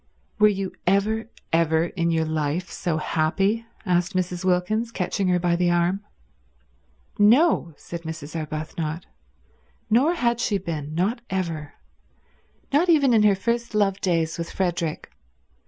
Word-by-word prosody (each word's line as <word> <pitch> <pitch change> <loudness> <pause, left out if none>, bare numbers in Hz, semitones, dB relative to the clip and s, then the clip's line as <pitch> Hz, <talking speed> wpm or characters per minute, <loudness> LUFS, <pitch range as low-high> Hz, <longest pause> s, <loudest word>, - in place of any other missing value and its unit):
"Were 210 - +7
you 195 -2 -1
ever, 215 +4 +1 0.2
ever 160 -1 +3
in 170 -1 -1
your 160 -1 +1
life 155 +3 -2
so 165 -3 -2
happy?" 195 +9 0 0.2
asked 175 -1 +1
Mrs. 180 -1 -1
Wilkins, 190 +6 +1
catching 185 -1 -1
her 180 -1 +3
by 175 -1 +1
the 175 0 +2
arm. 175 +3 +1 1.2
"No," 215 - +4
said 170 -1 -7
Mrs. 160 -2 -7
Arbuthnot. 155 +1 -4 0.9
Nor 280 +10 +4
had 240 -6 +1
she 210 -4 +1
been; 155 -5 -5
not 210 +8 0
ever; 165 -6 -3 1.0
not 335 +5 +3
even 285 -6 +5
in 220 - +5
her 210 -2 +5
first 235 +3 -2
love 200 -2 +1
days 165 -2 0
with 170 - -4
Frederick. 170 -4 -2
180 Hz, 140 wpm, -24 LUFS, 165-210 Hz, 1.2 s, Were